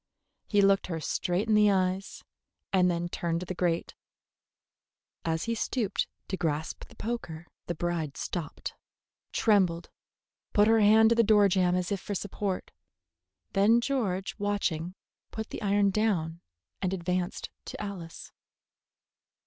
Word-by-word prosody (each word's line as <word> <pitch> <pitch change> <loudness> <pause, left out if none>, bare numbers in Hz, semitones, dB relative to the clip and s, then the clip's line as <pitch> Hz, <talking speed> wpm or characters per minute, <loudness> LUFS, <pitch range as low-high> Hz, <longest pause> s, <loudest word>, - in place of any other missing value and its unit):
He 205 -2 +3
looked 195 0 +4
her 165 -3 -3
straight 180 +6 -1
in 220 - +3
the 210 0 +6
eyes, 190 0 0 0.5
and 180 -1 +4
then 175 0 -1
turned 170 -1 -2
to - - -4
the 185 - -4
grate. 170 -2 -1 1.3
As 160 0 -1
he 230 - -1
stooped 225 -2 -1 0.2
to 190 - -2
grasp 160 -3 -2
the - - -18
poker 175 -8 -5 0.2
the 175 - -2
bride 165 -3 -2
stopped, 170 -5 -4 0.6
trembled, 185 -6 +2 0.6
put 205 0 +5
her 225 0 +5
hand 220 +1 +6
to 235 - +4
the 230 - +5
door 210 -2 +5
jamb 180 -1 +2
as 180 0 -1
if 200 - 0
for 205 - -4
support. 200 -1 -3 0.8
Then 210 +4 +5
George, 225 -8 -1
watching, 185 -4 -1 0.3
put 220 0 -6
the - - -5
iron 200 -1 +3
down 180 -6 0 0.4
and 190 -1 0
advanced 180 +1 -2
to - - -7
Alice. 190 -5 -7
190 Hz, 140 wpm, -29 LUFS, 175-210 Hz, 1.3 s, the